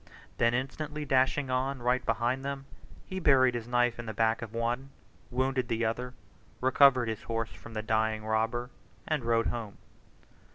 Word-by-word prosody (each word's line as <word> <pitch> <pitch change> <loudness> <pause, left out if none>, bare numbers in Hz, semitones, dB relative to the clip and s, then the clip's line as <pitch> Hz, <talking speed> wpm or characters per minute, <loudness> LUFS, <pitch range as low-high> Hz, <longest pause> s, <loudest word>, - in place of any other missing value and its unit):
Then 115 +1 +3
instantly 150 +4 -3
dashing 135 0 +2
on, 130 +1 0
right 125 +1 +2
behind 120 +3 0
them, 140 0 -4 0.4
he 190 - -5
buried 130 -6 +5
his 120 -1 -4
knife 120 -1 +2
in 120 - -6
the 110 - -5
back 115 +1 +2
of 115 -3 -6
one, 120 +4 -2 0.4
wounded 130 0 0
the 115 0 0
other, 125 +3 -3 0.4
recovered 130 -1 +5
his 110 -1 -3
horse 115 -1 -3
from 115 - -12
the 110 - -2
dying 110 0 0
robber, 115 +3 0 0.4
and 155 -5 0
rode 115 -1 +2
home. 110 -4 -4
120 Hz, 165 wpm, -30 LUFS, 115-130 Hz, 0.4 s, buried